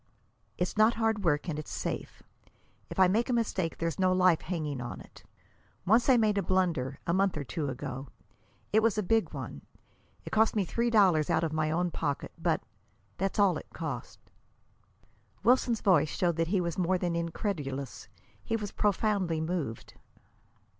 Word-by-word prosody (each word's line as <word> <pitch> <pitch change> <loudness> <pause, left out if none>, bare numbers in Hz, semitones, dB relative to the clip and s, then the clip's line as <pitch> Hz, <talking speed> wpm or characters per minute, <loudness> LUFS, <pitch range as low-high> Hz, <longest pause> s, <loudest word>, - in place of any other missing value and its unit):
"It's 180 +3 -2
not 220 +2 +5
hard 220 -2 0
work, 150 -1 +1
and 155 -3 -2
it's 155 - -7
safe. - - -5 0.7
If - - -6
I 190 - +7
make 225 +7 +1
a - - +2
mistake 195 -8 -1
there's 165 0 -2
no 185 -1 +3
life 185 -2 +4
hanging 155 -6 -3
on 120 - -6
it. - - -15 0.6
Once 225 +7 +4
I 255 - +7
made 210 -3 +2
a - - +1
blunder, 170 -8 0
a 170 - +1
month 190 -2 +2
or 145 - -2
two 145 +1 -3
ago. 135 +1 -5 0.7
It 220 - +5
was 225 -1 +2
a 210 - +1
big 225 +3 +1
one. - - -7 0.6
It - - -7
cost 220 +1 +3
me 205 -3 +1
three 235 +7 0
dollars 185 -9 +4
out - - +2
of 160 -1 -1
my 155 0 0
own 175 +2 0
pocket. 145 -3 -3
But 165 -1 0 0.6
that's 195 +1 -1
all 200 -3 +3
it - - -14
cost." - - -5 1.3
Wilson's 240 -2 +3
voice 160 -6 +4
showed 170 -1 0
that 165 0 +1
he 185 +1 +1
was 170 0 -3
more 185 +1 +2
than 175 -1 -1
incredulous; 155 - -4 0.4
he 225 - -1
was 210 -3 -4
profoundly 200 -5 +1
moved. 160 -8 -3
180 Hz, 175 wpm, -30 LUFS, 160-210 Hz, 1.3 s, I